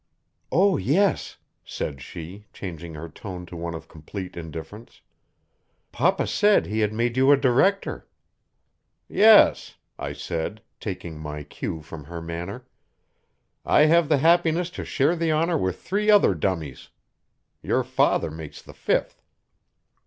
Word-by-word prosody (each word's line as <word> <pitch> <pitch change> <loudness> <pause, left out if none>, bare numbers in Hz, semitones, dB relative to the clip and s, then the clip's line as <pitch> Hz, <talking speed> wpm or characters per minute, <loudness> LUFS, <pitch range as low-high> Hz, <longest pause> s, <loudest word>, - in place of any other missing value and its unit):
"Oh, 190 +2 +4
yes," 170 - +1 0.3
said 70 -3 -5
she, 90 +9 -9
changing 85 -3 -7
her 80 +2 -7
tone 90 +2 -8
to 85 - -11
one 85 0 -4
of 80 - -9
complete 90 +4 -8
indifference. 80 +7 -9 0.9
"Papa - - +1
said 210 0 +3
he 110 +1 -2
had 105 -1 +1
made 120 +2 -1
you 135 +2 +5
a 145 - +7
director." 140 +10 +1 1.0
"Yes," 215 +1 +5 0.2
I - - -4
said, 90 +6 -4 0.2
taking 85 -6 -6
my 75 -1 -6
cue 80 +2 -6
from 75 -1 -10
her 85 +2 -7
manner. 85 +8 -6 1.0
"I - - +4
have 160 +1 +4
the 150 - +4
happiness 170 +3 +3
to - - -6
share 150 +4 +1
the 165 -1 -1
honor 165 +2 +1
with 95 -4 -2
three 210 +2 -1
other 205 - +6
dummies. 80 -5 -3 0.7
Your - - 0
father - - +1
makes 80 -1 -9
the - - -14
fifth." - - -1
100 Hz, 140 wpm, -24 LUFS, -, 1.0 s, a